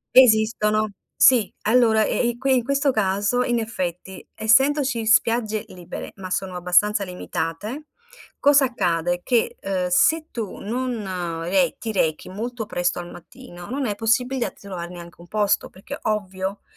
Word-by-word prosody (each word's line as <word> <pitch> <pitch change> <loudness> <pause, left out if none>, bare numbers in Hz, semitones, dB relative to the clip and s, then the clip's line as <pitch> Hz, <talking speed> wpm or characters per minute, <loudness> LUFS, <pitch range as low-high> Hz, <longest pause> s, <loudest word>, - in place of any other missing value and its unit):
Esistono, 215 -3 +4 0.3
sì. 240 -6 +5
Allora, 220 -1 +4
e - - -1
eh, 240 - +1
i 240 - -4
qui, 265 +1 +2
in 245 - +1
questo 280 +2 +1
caso, 205 +2 +1
in 240 -1 0
effetti, 185 -4 -5
essendoci 255 +2 +2
spiagge 220 -1 +2
libere, 180 -1 -9
ma 185 -1 -8
sono 185 0 -2
abbastanza 180 +4 +2
limitate, 180 - -5 0.5
cosa 285 -1 +5
accade? 175 -7 -1
Che, 240 -2 +1
ehm, 185 -2 -2
se 315 - +3
tu 225 -5 -5
non 200 -8 -3
re 195 +10 +1
ti 225 - -4
rechi 160 -6 0
molto 225 +4 -5
presto 175 -3 -1
al 175 0 -8
mattino, 175 +1 -12
non 270 +2 -2
è 210 - -1
possibilità 245 +4 0
di - - -25
trovare 180 -4 -6
neanche 170 -1 -11
un 175 - -14
posto, 205 +1 0
perché, 190 - -9
ovvio, 195 -2 -2
215 Hz, 155 wpm, -23 LUFS, 185-245 Hz, 0.5 s, sì